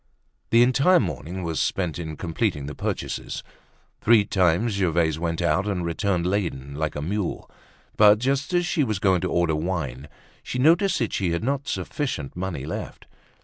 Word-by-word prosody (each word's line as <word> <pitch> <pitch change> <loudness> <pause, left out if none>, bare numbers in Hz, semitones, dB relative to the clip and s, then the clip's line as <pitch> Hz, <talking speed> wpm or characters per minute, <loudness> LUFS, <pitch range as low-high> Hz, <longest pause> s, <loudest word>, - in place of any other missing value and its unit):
The 115 +1 +6
entire 140 +9 +4
morning 90 - -4
was 80 -2 -2
spent 90 -3 -1
in 80 -3 -5
completing 80 -4 -1
the 75 - -6
purchases. - - -4 0.6
Three 110 -2 +5
times 95 +4 +2
Gervaise 85 -5 +1
went 85 0 -2
out 85 +4 +1
and 90 -4 -1
returned 85 +1 0
laden 85 -8 -2
like 75 +1 -2
a 75 - -3
mule. 100 +3 -3 0.5
But 105 0 +7
just 135 - -1
as 175 -1 +2
she 170 -3 +1
was 110 -5 -1
going 95 -3 +2
to 90 - -2
order 85 -2 +2
wine 75 -5 -3 0.3
she - - -5
noticed 165 +9 +4
that 115 - -1
she 90 -4 0
had 85 - -2
not 140 +2 -1
sufficient 130 - -3
money 90 -6 -4
left. 80 - -6
90 Hz, 170 wpm, -24 LUFS, 80-110 Hz, 0.6 s, But